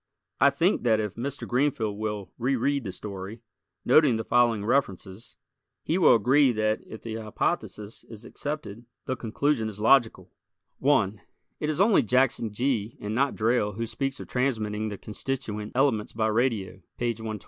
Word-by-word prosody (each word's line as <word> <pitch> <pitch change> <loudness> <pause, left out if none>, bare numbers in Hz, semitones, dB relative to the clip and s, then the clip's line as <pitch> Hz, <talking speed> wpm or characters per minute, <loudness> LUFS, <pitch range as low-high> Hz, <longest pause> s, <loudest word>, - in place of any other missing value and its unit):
I 140 - +6
think 165 +8 +1
that 110 -3 +2
if 105 -3 -2
Mr. 135 +4 -5
Greenfield 125 -5 0
will 105 -2 -4
reread 135 +2 0
the 95 - -3
story, 100 +3 -8 0.4
noting 135 -1 +5
the 110 - -2
following 115 -4 +2
references, 110 -3 -2 0.5
he 170 +4 0
will 170 - +7
agree 130 +5 +4
that 110 0 0
if 110 - -10
the 115 -1 -5
hypothesis 105 -1 -3
is 115 0 -12
accepted 120 -5 -6 0.2
the 130 - -2
conclusion 115 0 -1
is 105 -1 -9
logical: 115 +1 +3 0.5
1 110 -8 +2 0.4
It 150 - -2
is 155 - -2
only 200 -4 +5
Jackson 125 -2 +1
Gee 115 -1 -1
and 105 +1 -4
not 135 +4 +1
Drayle 110 -2 +1
who 115 +2 -2
speaks 135 +4 -3
of - - -8
transmitting 110 -5 -1
the 100 - -6
constituent 105 -1 -5
elements 125 -6 +1
by 110 0 0
radio 110 -5 -1 0.2
(page 120 -2 -2
120). 110 -1 -5
115 Hz, 160 wpm, -26 LUFS, 105-135 Hz, 0.5 s, will